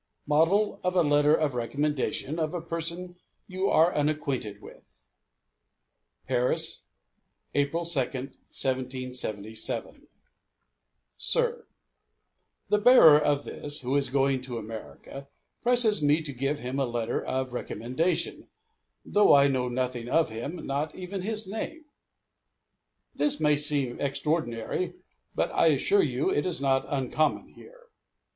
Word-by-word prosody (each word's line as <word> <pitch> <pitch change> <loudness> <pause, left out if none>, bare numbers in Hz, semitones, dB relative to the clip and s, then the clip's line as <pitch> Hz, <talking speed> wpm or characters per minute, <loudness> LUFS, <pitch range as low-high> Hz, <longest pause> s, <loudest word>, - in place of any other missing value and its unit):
MODEL 165 +8 +2
OF 180 0 -1
A 175 - +4
LETTER 145 0 +4
OF 150 -4 0
RECOMMENDATION 145 +4 -2
OF 155 +2 -2
A 175 - -3
PERSON 170 +2 -4 0.3
YOU 190 +1 -1
ARE 165 +3 +4
UNACQUAINTED 140 -8 -2
WITH - - -17 1.2
PARIS, 125 +1 0 0.7
April 145 +4 0
2, 165 -4 +3
1777. 125 -4 -3 1.1
Sir: 480 -1 +1 1.0
The 210 - +3
bearer 205 -10 +8
of 145 -1 0
this, 145 +1 -4
who 130 +2 -2
is 140 -2 +1
going 135 0 +1
to 125 -2 -6
America, 115 +5 -9 0.3
presses 240 -6 +4
me 150 +2 +2
to 145 -2 -3
give 135 +4 -2
him 130 +1 -4
a 135 - +1
letter 120 -1 -2
of 130 -1 -3
recommendation, 130 - -2 0.6
though 205 -7 +5
I 140 0 +6
know 130 -2 0
nothing 125 -1 -3
of 165 -4 +2
him, 140 +10 -6
not 145 +3 -3
even 185 +1 -6
his 215 +1 -2
name. 300 +10 -6 1.3
This 295 -1 +3
may 150 -1 +3
seem 145 -4 -1
extraordinary, 140 +3 -2 0.4
but - - 0
I - - +3
assure 405 0 +3
you 375 0 0
it 390 - 0
is 175 - -2
not 135 -1 +1
uncommon 145 +2 -1
here. - - -17
145 Hz, 125 wpm, -27 LUFS, 130-175 Hz, 1.3 s, bearer